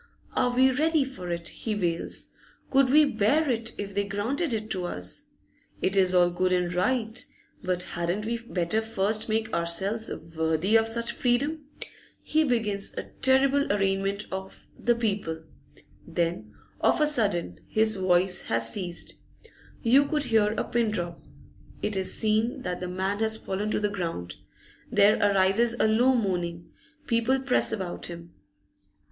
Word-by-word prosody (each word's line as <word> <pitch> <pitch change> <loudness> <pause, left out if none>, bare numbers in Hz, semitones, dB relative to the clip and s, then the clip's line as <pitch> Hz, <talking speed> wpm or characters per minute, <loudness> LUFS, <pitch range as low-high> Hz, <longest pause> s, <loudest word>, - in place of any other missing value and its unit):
Are 245 - +2
we 260 +1 +5
ready 310 +2 +2
for 225 -10 -7
it? 170 0 -3
he 220 -2 -4
wails. 170 -4 -2 0.4
Could 270 -1 +4
we 300 +3 +6
bear 280 +5 +2
it, 230 -1 -2
if 200 -1 -5
they 200 +1 +1
granted 230 - -2
it 215 -1 -3
to 185 -2 +1
us? 90 - -2 0.5
It 190 - 0
is 185 -2 +4
all 175 -1 +5
good 185 +1 0
and 180 -1 +1
right, 225 +4 0 0.4
but 180 -1 -1
hadn't 175 +5 -3
we 235 +1 -2
better 215 -2 -1
first 220 0 0
make 220 0 -1
ourselves 190 +7 +1 0.3
worthy 160 +6 +1
of 225 0 +4
such 235 +1 0
freedom? 285 +5 0 0.6
He 315 +1 +2
begins 220 -7 -1
a - - -6
terrible 270 +1 +3
arraignment 195 0 0
of 190 0 -7
the 240 0 +1
People, 200 -8 -2 0.6
then, 165 -11 -2 0.3
of - - +3
a 305 - +4
sudden, 200 - 0
his 220 0 +2
voice 185 -1 +3
has 115 0 +1
ceased. 180 -4 -5 0.7
You 270 +4 +5
could 300 0 +1
hear 220 -4 +2
a - - -1
pin 235 -2 0
drop. 175 -5 -3 0.6
It 210 - 0
is 190 -1 0
seen 220 +2 0
that 180 0 -3
the 180 - -4
man 190 +3 -2
has 220 0 +2
fallen 205 0 -3
to - - 0
the 210 - +1
ground; 165 - -4 0.6
there 205 +2 +5
arises 205 +4 +3
a 230 - +2
low 245 +4 +4
moaning; 175 -6 -2 0.3
people 235 +2 +1
press 265 -1 +2
about 185 -3 -4
him. 170 -1 -9
210 Hz, 155 wpm, -27 LUFS, 180-235 Hz, 0.7 s, we